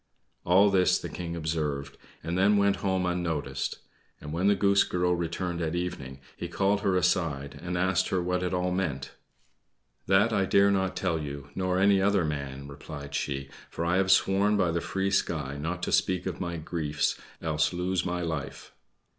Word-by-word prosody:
All 95 +3 +5
this 95 -2 +4
the - - -6
King 85 -1 -5
observed, 75 -4 -2 0.3
and 85 - -2
then 100 +3 +4
went 100 0 +3
home 95 -2 0
unnoticed; 80 -6 -2 0.4
and 75 0 -7
when 90 +4 +1
the 100 - +5
Goose 100 0 +4
Girl 90 0 0
returned 85 +1 -3
at 80 0 -1
evening, 70 -7 -4 0.2
he 85 - -5
called 100 +3 +1
her 100 -3 +1
aside, 80 -6 0
and 90 +1 -3
asked 95 0 +2
her 95 - +1
what 90 +1 -1
it 90 - -1
all 90 0 0
meant. 80 -8 -2 1.0
"That 105 +4 +4
I 100 -2 +2
dare 100 +1 +4
not 95 -1 0
tell 85 -4 0
you, 70 -1 -7
nor 95 -1 0
any 100 0 +4
other 100 -3 +3
man," 70 -2 -4
replied 70 0 -9
she; 70 -1 -3 0.2
"for 85 - -4
I 85 +2 +2
have 95 0 +2
sworn 100 +2 +3
by 90 -4 +2
the 85 0 -1
free 95 +2 -1
sky 75 -8 0
not 85 +5 -4
to - - -1
speak 90 -1 +1
of 95 -2 -4
my 85 -1 -3
griefs, 75 -3 -1 0.2
else 80 -1 0
lose 90 +1 -1
my 90 0 -2
life." 80 -4 -5
90 Hz, 185 wpm, -28 LUFS, 75-95 Hz, 1.0 s, All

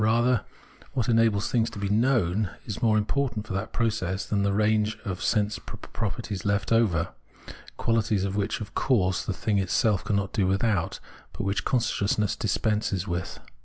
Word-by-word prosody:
Rather, 115 +2 +3 0.5
what 125 -5 0
enables 115 -3 +3
things 115 -2 +2
to 115 - -10
be 100 0 -2
known 105 -3 +2 0.2
is 105 - -5
more 110 -2 +4
im 105 - +1
portant 125 -4 -1
for 100 - -5
that 100 +3 -3
process 105 -5 -1
than 100 -1 0
the 100 0 +2
range 105 +1 +2
of 95 -2 -4
sense 105 -1 +1
pro - - -9
perties 100 - -4
still 100 - -2
left 100 +1 -1
over, 115 -8 +3 0.7
qualities 110 -4 +1
which, 100 +2 -1
of 105 - -7
course, 95 -8 +2
the - - -2
thing 100 +2 0
itself 95 +2 +2
cannot 100 -2 -1
do 100 -4 +2
without, 95 -2 0 0.3
but - - -4
which 100 +1 -1
consciousness 105 -4 +1
dispenses 105 0 0
with. 85 0 -3
105 Hz, 170 wpm, -27 LUFS, 100-115 Hz, 0.7 s, more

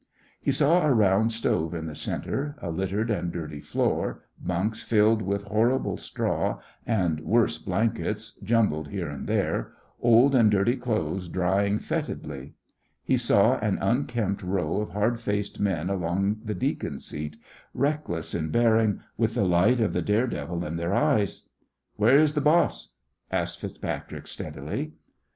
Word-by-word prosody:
He - - +1
saw 160 +5 +4
a 150 - +3
round 110 -1 +4
stove 85 -7 0
in 80 -1 -4
the 80 - -5
centre, 145 - -3
a 85 - -4
littered 95 +6 -1
and 90 -5 -1
dirty 80 -3 -6
floor, - - -1 0.2
bunks 95 +5 -1
filled 110 0 +3
with 100 0 -1
horrible 110 +6 +1
straw - - -2 0.3
and 90 -9 +1
worse 115 +8 +2
blankets 110 +2 -1
jumbled 105 -10 +1
here 90 -4 -4
and 70 -1 -6
there, - - -1 0.3
old 120 +4 +5
and 115 -5 +6
dirty 105 +4 +3
clothes 110 -7 -2
drying 95 +3 +1
fetidly. 75 -8 -4 0.5
He - - +2
saw - - +3
an - - 0
unkempt 115 -5 0
row 90 -3 -1
of 105 - -4
hard 110 +4 0
faced 105 -2 -2
men 90 -5 0
along 95 +2 0
the 105 -1 -2
deacon 90 - -2
seat, 75 0 -6 0.4
reckless 140 - -1
in 80 -1 -2
bearing, 110 +1 +3 0.2
with 115 0 +1
the 105 - +2
light 95 +8 +4
of 110 -3 +1
the - - 0
dare 105 +4 +2
devil 85 - -4
in 80 +2 -3
their 85 +4 -1
eyes. 135 -10 +1 0.5
"Where 115 +6 +6
is 150 0 +4
the 150 - 0
boss?" 155 +4 +2 0.4
asked - - -1
FitzPatrick, - - -5
steadily. - - -5
105 Hz, 150 wpm, -26 LUFS, 90-115 Hz, 0.5 s, and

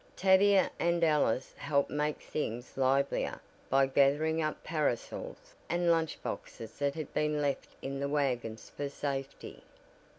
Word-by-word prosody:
Tavia 195 +1 +5
and 170 0 +2
Alice 145 -6 +2
helped 140 -1 0
make 150 +1 -1
things 120 -4 -4
livelier 135 +1 +1 0.3
by 135 +1 +5
gathering 145 +4 +3
up 155 -1 -2
parasols 150 -7 -3 0.2
and 175 0 +2
lunch 165 -1 0
boxes 110 -1 -7
that 140 -1 0
had 155 -3 -6
been 150 0 +1
left 145 -1 -1
in 135 0 -3
the 140 0 -1
wagons 125 -6 -1
for 145 -1 -3
safety. 135 -1 -5
145 Hz, 135 wpm, -31 LUFS, 135-160 Hz, 0.3 s, Tavia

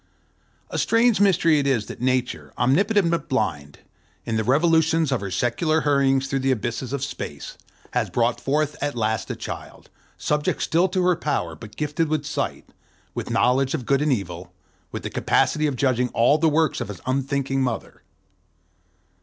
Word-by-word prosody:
A - - -2
strange 230 -2 +3
mystery 165 -6 +4
it 140 - 0
is 120 -6 +1
that - - -9
Nature, 125 - -1
omnipotent 180 - +3
but 170 - -2
blind, 75 - -2 0.5
in 115 - -2
the 110 - +1
revolutions 160 +3 +3
of 130 - 0
her 100 - -4
secular 155 - +1
hurryings 135 -2 +2
through 135 - -1
the 135 0 0
abysses 120 0 -2
of 140 -1 -2
space, 75 - -6 0.4
has - - 0
brought 120 0 0
forth 150 +2 0
at 145 -1 -2
last 110 -3 -1
a - - -3
child, - - -8 0.3
subject 150 0 -1
still 170 +3 +2
to 185 0 0
her 180 0 +3
power, 140 - -2
but 105 +6 -12
gifted 150 +2 -1
with 150 -1 -1
sight, 145 - -3 0.5
with - - -5
knowledge 130 +3 +2
of 130 -6 -5
good 140 +2 +2
and 150 -1 +2
evil, 90 -7 -3 0.4
with - - -6
the - - -4
capacity 155 0 +1
of 140 - -2
judging 125 -2 +1
all 130 +7 +4
the 160 +1 +4
works 155 -1 +1
of - - -3
his 100 -3 -8
unthinking 135 +1 -1
Mother. 125 -3 -3
135 Hz, 175 wpm, -23 LUFS, 120-155 Hz, 0.5 s, mystery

